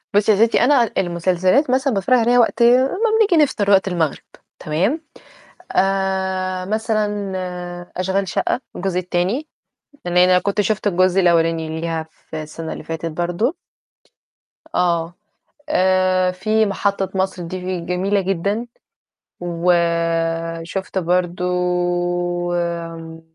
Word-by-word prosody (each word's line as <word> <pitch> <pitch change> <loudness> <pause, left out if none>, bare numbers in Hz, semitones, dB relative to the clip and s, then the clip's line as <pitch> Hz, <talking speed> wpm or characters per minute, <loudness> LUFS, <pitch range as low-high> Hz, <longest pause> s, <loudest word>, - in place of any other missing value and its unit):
بُصّي 210 +1 +4
يا 215 +2 +5
ستي - - +1
أنا 250 -4 +3
المسلسلات 185 - +1
مثلًا 265 +1 +1
باتفرّج 200 +5 +2
عليها 240 +2 +3
وقت 235 0 +3
ما 255 +9 +4 0.2
بنيجي 360 -8 +5
نفطر 210 -8 -1
وقت 195 -1 +4
المغرب، 170 -6 -1 0.4
تمام، 190 - 0 0.7
آآ 190 -1 0
مثلًا 210 -1 -1 0.6
أشغال 190 +1 -1
شقّة 210 - -1 0.2
الجزء 185 0 -2
التاني، 185 - -1 0.6
لإن 175 0 -1
أنا 180 0 +6
كنت 200 +2 0
شُفت 210 0 -1
الجزء 185 0 +3
الأولاني 165 -2 +1
ليها 165 -1 -2
في 160 0 -9
السنة 160 +1 -6
اللي - - -9
فاتت 165 0 -4
برضو. 175 - -1 1.2
آه. 170 -1 +1 0.6
آآ 185 0 +2
في 215 +4 +1
محطة 200 -1 -1
مصر 190 -1 -1
دي 185 +1 -4
جميلة 185 +4 0
جدًا. 200 +5 -1 0.7
وشُفت 170 0 -1
برضو 180 0 0 1.1
آمم 165 -1 -4
185 Hz, 115 wpm, -20 LUFS, 170-205 Hz, 1.2 s, أنا